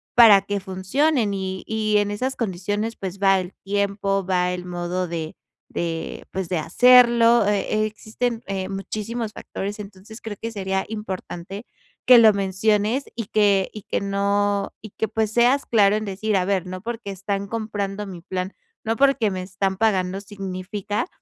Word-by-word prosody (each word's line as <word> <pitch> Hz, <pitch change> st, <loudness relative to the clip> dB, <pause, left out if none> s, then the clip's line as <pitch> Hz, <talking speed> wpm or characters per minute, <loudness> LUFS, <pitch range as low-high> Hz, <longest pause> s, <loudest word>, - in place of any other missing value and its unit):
para 220 Hz, -5 st, +8 dB
que 200 Hz, 0 st, -3 dB
funcionen 210 Hz, +6 st, 0 dB
y 190 Hz, -1 st, -4 dB
y 215 Hz, -1 st, +1 dB
en 205 Hz, 0 st, +1 dB
esas 255 Hz, +6 st, -2 dB
condiciones, 205 Hz, +2 st, -2 dB
pues, 190 Hz, 0 st, -6 dB
va 195 Hz, -1 st, +4 dB
el 180 Hz, +1 st, -8 dB
tiempo, 200 Hz, -1 st, 0 dB
va 180 Hz, -1 st, +1 dB
el 180 Hz, 0 st, -5 dB
modo 180 Hz, +1 st, -3 dB
de 165 Hz, -2 st, -5 dB, 0.4 s
de, 165 Hz, -1 st, -4 dB
pues, 190 Hz, -2 st, -4 dB
de 180 Hz, -, 0 dB
hacerlo. 235 Hz, +4 st, +6 dB
Eh 205 Hz, -1 st, +1 dB
eh, 215 Hz, 0 st, +2 dB
existen, 225 Hz, +2 st, -3 dB
eh, 190 Hz, -1 st, -3 dB
muchísimos 215 Hz, +3 st, -4 dB
factores, 205 Hz, +2 st, -6 dB
entonces, 205 Hz, +2 st, -10 dB
creo 210 Hz, -3 st, -6 dB
que 230 Hz, -, -4 dB
sería 190 Hz, -2 st, -2 dB
importante 195 Hz, -1 st, -6 dB, 0.4 s
que 250 Hz, -1 st, +9 dB
lo 220 Hz, -2 st, +7 dB
menciones 210 Hz, +6 st, +1 dB
y 230 Hz, -4 st, -4 dB
que 200 Hz, -3 st, +3 dB
y 215 Hz, -, -8 dB
que -, -, -2 dB
no 200 Hz, 0 st, 0 dB
y 215 Hz, -, -9 dB
que, 220 Hz, -, 0 dB
pues, 220 Hz, 0 st, -1 dB
seas 245 Hz, +4 st, +3 dB
claro 205 Hz, -3 st, +4 dB
en 215 Hz, -, -1 dB
decir: 200 Hz, +2 st, -2 dB
"A 180 Hz, -, +1 dB
ver, 190 Hz, -2 st, 0 dB
no 185 Hz, 0 st, -6 dB
porque 230 Hz, -2 st, -5 dB
están 195 Hz, +1 st, -3 dB
comprando 210 Hz, -2 st, -3 dB
mi 185 Hz, -3 st, -8 dB
plan, 185 Hz, +2 st, -4 dB, 0.3 s
no 225 Hz, +1 st, 0 dB
porque 270 Hz, -7 st, +3 dB
me 185 Hz, -1 st, -4 dB
están 190 Hz, 0 st, -2 dB
pagando 190 Hz, -3 st, +1 dB
significa 200 Hz, -, -4 dB
200 Hz, 170 wpm, -23 LUFS, 190-220 Hz, 0.4 s, que